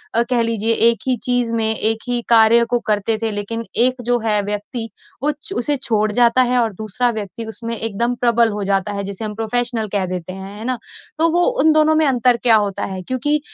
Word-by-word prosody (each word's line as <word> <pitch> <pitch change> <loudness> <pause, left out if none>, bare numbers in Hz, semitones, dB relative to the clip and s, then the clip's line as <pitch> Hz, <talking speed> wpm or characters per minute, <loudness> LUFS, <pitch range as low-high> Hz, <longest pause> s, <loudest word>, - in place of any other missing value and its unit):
अ, 230 - +5
कह 245 -2 +1
लीजिए, 230 -1 +1
1 230 +1 +4
ही 255 - +2
चीज़ 245 -2 0
में 220 -1 +1
1 220 +1 +2
ही 245 -1 0
कार्य 230 0 +6
को 245 - +1
करते 215 +1 0
थे 225 -1 -1
लेकिन 210 +3 -4 0.2
1 255 0 +1
जो 245 0 +1
है 210 -2 +2
व्यक्ति, 210 +3 -5 0.3
वो 300 - +2
च 300 +6 -9
उसे 290 +4 +1
छोड़ 215 -5 -1
जाता 240 +3 +3
है 250 0 +2
और 225 -3 0
दूसरा 220 +5 -2
व्यक्ति 215 0 -6
उसमें 230 +1 -4
एकदम 225 +3 -1
प्रबल 235 -2 +2
हो 205 0 -4
जाता 195 +1 -1
है 200 0 -4
जिसे 200 +2 -6
हम 210 - -5
प्रोफेशनल 225 0 -2
कह 200 -2 0
देते 185 0 -6
हैं। 195 +1 -9
है 220 - -8
ना? 255 0 -1 0.4
तो 330 +1 +4
वो, 350 +2 +2 0.2
उन 315 +2 +4
दोनों 310 0 +3
में 315 0 +3
अंतर 250 -3 +2
क्या 235 -2 +6
होता 205 -2 -1
है? 190 -1 -6
क्योंकि 260 +8 -1
230 Hz, 225 wpm, -18 LUFS, 210-245 Hz, 0.4 s, कार्य